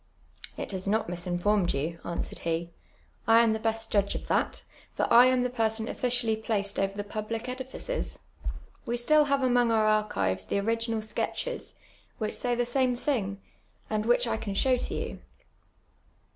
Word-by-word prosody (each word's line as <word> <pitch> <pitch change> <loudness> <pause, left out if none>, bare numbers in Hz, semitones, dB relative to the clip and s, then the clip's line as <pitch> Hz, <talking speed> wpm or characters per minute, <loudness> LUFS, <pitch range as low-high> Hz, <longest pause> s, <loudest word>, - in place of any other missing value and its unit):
" - - -31
It - - -4
has 190 0 -3
not 215 +2 +1
misinformed 175 +2 0
you," 160 +4 -2
answered 170 - -4
he; 170 +1 -2 0.6
I 225 +1 +7
am 230 -2 +4
the 220 - -2
best 225 0 -1
judp' 200 -1 +2
of - - -5
that; - - 0 0.3
for - - +1
I 240 +2 +9
am 255 -1 +3
the* 250 - 0
person 225 -2 0
officially 235 -3 0
])laced 200 -2 0
over 195 +1 0
the 205 - -2
j)iil)lie 215 +2 -3 0.2
ediliees. 265 - -4 0.7
AVe 240 +1 0
still 300 +5 +5
have 280 -1 +1
amon^ 245 -2 +3
our 215 -1 +4
iirchivefl 95 - -1
tlie 200 - +1
oriu:inal 230 0 0
sketches, - - -3 0.4
which 215 -2 -2
say 245 -1 0
the 240 0 +1
same 250 0 +1
thinj;, 220 -8 -1 0.5
and 215 0 0
which 245 +1 +4
I 225 -1 0
can 205 -2 -4
show 260 +5 +3
to 245 - -2
you." - - -4
220 Hz, 170 wpm, -28 LUFS, 200-245 Hz, 0.7 s, I